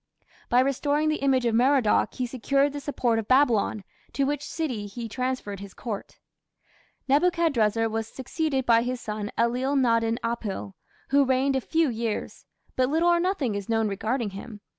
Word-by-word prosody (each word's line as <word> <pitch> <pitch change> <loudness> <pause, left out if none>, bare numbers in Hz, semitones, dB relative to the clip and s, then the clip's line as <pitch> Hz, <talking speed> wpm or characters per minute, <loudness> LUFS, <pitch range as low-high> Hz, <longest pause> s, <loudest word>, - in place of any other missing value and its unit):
By 245 +1 +5
restoring 285 +3 +1
the 310 - +1
image 265 -3 +2
of 235 - +1
Merodach 250 -1 +3
he 255 - -1
secured 275 +3 +1
the 290 - -4
support 250 -5 0
of 215 - -5
Babylon, 240 -6 +3 0.3
to 280 - 0
which 290 +1 -1
city 250 -11 -3
he 230 +3 -6
transferred 250 -4 -3
his 200 -1 -10
Court. 215 -5 -6 0.9
Nebuchadrezzar 275 - +2
was 225 0 -3
succeeded 270 +2 -2
by 230 -1 +5
his 250 +1 -3
son 210 -2 -4
Ellil 250 +4 +1
nadin 230 -3 +2
apil, 230 -4 -3 0.4
who 280 +1 +5
reigned 265 +1 +1
a 265 - +1
few 325 +5 +1
years; 230 -3 -4 0.3
but 255 0 +2
little 325 +4 +2
or 345 0 +4
nothing 340 - 0
is 200 0 -5
known 225 -1 +2
regarding 220 +3 -2
him. 205 +2 -9
250 Hz, 165 wpm, -26 LUFS, 225-275 Hz, 0.9 s, By